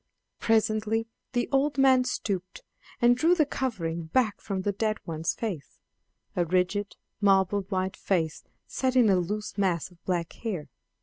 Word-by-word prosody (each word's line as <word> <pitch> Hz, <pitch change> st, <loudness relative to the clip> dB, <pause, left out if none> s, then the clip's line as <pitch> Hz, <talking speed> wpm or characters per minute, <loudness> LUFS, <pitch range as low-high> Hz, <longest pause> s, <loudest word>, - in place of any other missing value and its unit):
Presently 220 Hz, 0 st, +1 dB, 0.3 s
the 245 Hz, -1 st, +1 dB
old 280 Hz, +1 st, +2 dB
man 260 Hz, -2 st, +5 dB
stooped 190 Hz, -7 st, -3 dB, 0.4 s
and 240 Hz, 0 st, +6 dB
drew 330 Hz, +7 st, +4 dB
the 310 Hz, -4 st, +3 dB
covering 170 Hz, -, -3 dB
back 215 Hz, +5 st, +1 dB
from 190 Hz, -2 st, -3 dB
the 205 Hz, -, +1 dB
dead 215 Hz, +1 st, -1 dB
one's 160 Hz, 0 st, -2 dB
face 195 Hz, -11 st, -5 dB, 0.6 s
a 175 Hz, -, +2 dB
rigid, 185 Hz, +4 st, 0 dB, 0.3 s
marble 195 Hz, 0 st, +4 dB
white 190 Hz, -1 st, -1 dB
face 165 Hz, -5 st, -1 dB, 0.2 s
set 260 Hz, -1 st, -1 dB
in 235 Hz, -5 st, +6 dB
a 190 Hz, -, +4 dB
loose 205 Hz, +4 st, -3 dB
mass 185 Hz, -3 st, 0 dB
of 175 Hz, -, -22 dB
black 175 Hz, -2 st, -1 dB
hair. 195 Hz, -10 st, -5 dB
205 Hz, 150 wpm, -27 LUFS, 180-235 Hz, 0.6 s, and